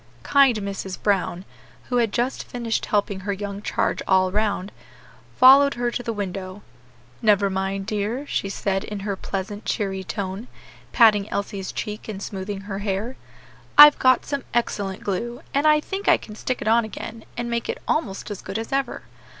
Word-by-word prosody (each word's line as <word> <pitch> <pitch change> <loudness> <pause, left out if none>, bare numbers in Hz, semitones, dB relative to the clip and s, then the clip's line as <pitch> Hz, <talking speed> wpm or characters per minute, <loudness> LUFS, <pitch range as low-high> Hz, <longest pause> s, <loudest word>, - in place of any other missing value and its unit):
Kind 275 -5 +4
Mrs. 195 -2 -5
Brown, 190 -2 0 0.4
who 245 - +1
had 230 -3 +2
just 245 +4 -1
finished 235 -2 -3
helping 205 -1 0
her 200 +2 -3
young 200 0 -5
charge - - -1
all 185 -1 +3
round, 200 -1 -1 0.7
followed 275 +2 +7
her 240 0 -1
to 245 - -3
the 235 - -3
window, 195 -1 -5 0.6
"Never 205 -3 +3
mind, 195 +1 -2
dear," 215 +7 -2
she 200 - -2
said 195 -1 -1
in 210 -1 -6
her 200 0 -2
pleasant, 200 +2 -5
cheery 195 -3 -2
tone, 190 +6 -5 0.4
patting 215 -3 +5
Elsie's 200 -1 -3
cheek 210 0 -5
and 210 -3 -5
smoothing 195 0 -5
her 195 -1 -5
hair 205 +5 -3 0.6
"I've 295 0 +10
got 255 -1 +4
some 280 -2 -3
excellent 200 -5 -1
glue, 235 +5 -3
and 285 +2 +2
I 305 0 +6
think 390 +6 -5
I - - +6
can 210 - -11
stick 250 +4 -3
it - - -5
on 230 +1 +4
again 220 +1 -7
and 240 0 -2
make 235 -1 -2
it - - -3
almost 210 -9 -2
as 205 - -6
good 195 - -5
as 225 0 -5
ever. 270 -2 -1
210 Hz, 175 wpm, -23 LUFS, 195-240 Hz, 0.7 s, I've